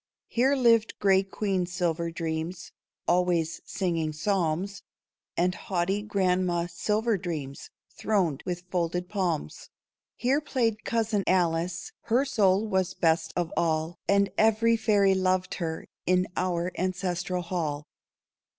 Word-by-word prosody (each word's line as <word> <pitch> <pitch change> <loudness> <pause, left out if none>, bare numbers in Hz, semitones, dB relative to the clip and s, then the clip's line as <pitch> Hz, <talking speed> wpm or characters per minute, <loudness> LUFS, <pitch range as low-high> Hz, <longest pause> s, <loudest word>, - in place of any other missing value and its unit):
Here 265 +4 +3
lived 230 -4 +3
grey 195 -1 +4
Queen 195 -2 -1
Silver 170 -2 -1
Dreams, 165 +1 -4 0.4
Always 175 -2 +1
singing 165 -5 -1
psalms, 185 +2 -1 0.6
And 180 +1 +2
haughty 190 +2 -1
Grandma 185 -4 +1
Silver 210 +5 0
Dreams, 150 -6 -5 0.2
Throned 180 -10 0
with 175 -1 -4
folded 180 0 -1
palms. 180 - -2 0.5
Here 270 +4 +1
played 230 -7 0
cousin 225 -3 0
Alice. 170 -1 +1
Her 245 +4 +2
soul 205 -6 +3
was 190 -3 0
best 160 -1 +2
of 175 -2 -1
all. 160 0 0
And 200 -1 +3
every 225 +1 +4
fairy 205 -3 +3
loved 185 -1 +1
her, 160 -1 -3 0.2
In 185 0 +3
our 180 -1 -1
ancestral 180 -1 -1
hall. 155 -5 -3
185 Hz, 120 wpm, -27 LUFS, 170-205 Hz, 0.6 s, grey